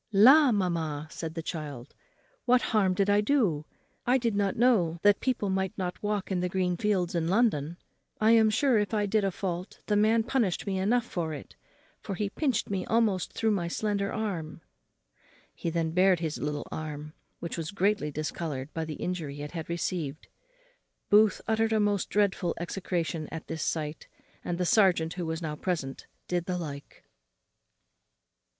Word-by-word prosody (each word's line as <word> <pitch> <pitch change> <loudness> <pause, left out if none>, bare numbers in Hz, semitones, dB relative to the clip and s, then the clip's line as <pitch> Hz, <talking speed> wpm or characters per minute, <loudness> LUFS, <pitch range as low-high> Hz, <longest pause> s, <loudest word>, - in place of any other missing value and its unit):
"La! 260 +8 +7
mamma," 165 -7 -1
said 165 -1 -6
the 165 - -4
child, 145 -6 -6 0.5
"what 250 0 +5
harm 195 -4 +3
did 195 +1 +2
I 205 0 +4
do? 205 - +1 0.4
I 250 +2 +3
did 235 -4 0
not 200 -1 +1
know 215 -9 +3
that 205 0 +5
people 235 -7 0
might 190 +2 -1
not 180 -2 -4
walk 205 -2 -2
in 185 - +1
the 180 0 -1
green 180 -1 0
fields 190 -2 0
in 165 -2 0
London. 175 - +1 0.4
I 220 +1 +4
am 225 -1 +6
sure 230 +2 +3
if 210 +1 -1
I 210 -1 +1
did 210 +1 +1
a 195 - +2
fault, 180 -1 -4
the 210 - +1
man 220 +2 +4
punished 235 -7 0
me 195 -2 -1
enough 230 +5 +2
for 165 -8 -3
it, 145 - -11 0.5
for 195 - -4
he 200 +1 -2
pinched 260 -6 0
me 195 -2 -2
almost 220 -5 +1
through 220 -1 +1
my 180 -5 0
slender 200 +2 -1
arm." 170 -8 -4 0.9
He 170 - -3
then 165 -1 -1
bared 185 +1 +4
his 160 -2 -3
little 150 0 -3
arm, 150 -1 -6 0.3
which 170 - -5
was 165 -2 -4
greatly 200 -5 +1
discoloured 150 -2 -4
by 160 -1 -2
the 155 -1 -5
injury 155 -6 -4
it 145 - -6
had 165 -2 -6
received. 170 -4 -3 0.8
Booth 210 -1 +5
uttered 225 0 +2
a 220 - +3
most 205 -2 +1
dreadful 200 -4 +1
execration 170 -3 -3
at 160 - -6
this 160 -1 -5
sight, 155 -1 -3 0.4
and 175 - -2
the 180 - 0
serjeant, 180 -6 +3
who 180 -2 -4
was 160 +1 -3
now 155 -1 -3
present, 150 -6 -3 0.2
did 175 -1 -1
the 180 -1 -2
like. 145 -5 -8
185 Hz, 175 wpm, -28 LUFS, 160-210 Hz, 0.9 s, La